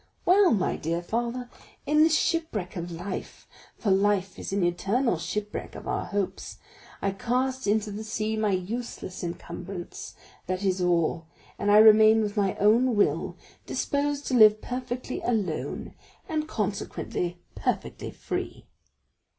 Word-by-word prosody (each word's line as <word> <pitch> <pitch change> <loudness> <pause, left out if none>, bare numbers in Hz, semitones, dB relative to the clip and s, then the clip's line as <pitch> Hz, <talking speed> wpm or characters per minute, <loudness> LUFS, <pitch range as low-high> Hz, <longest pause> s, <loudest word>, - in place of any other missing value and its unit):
Well, 380 +1 +6
my 200 - +1
dear 170 +2 -2
father, 240 +5 -2 0.4
in 300 +1 +4
the 320 - +6
shipwreck 320 - 0
of 175 -1 -5
life—for 190 +4 -6
life 195 -1 +2
is - - -5
an 195 -1 +1
eternal 195 +4 +1
shipwreck 210 +4 -4
of - - -8
our - - -1
hopes—I 195 0 -5
cast 255 +5 -1
into 210 0 +1
the 210 +2 -5
sea 215 0 -2
my 215 -1 +1
useless 190 0 -4
encumbrance, 175 +1 -7 0.3
that 185 +2 -2
is 190 -1 +1
all, 170 -2 +1 0.3
and 205 - 0
I 205 - +7
remain 220 0 +7
with 205 -1 -3
my 195 -2 +1
own 230 +4 +4
will, 205 - +1 0.3
disposed 285 0 -1
to - - -2
live 215 -3 +7
perfectly 250 +1 -4
alone, 205 -9 -2 0.3
and 310 -3 -2
consequently 195 - -3 0.2
perfectly - - -3
free." - - -5
210 Hz, 135 wpm, -27 LUFS, 185-245 Hz, 0.4 s, I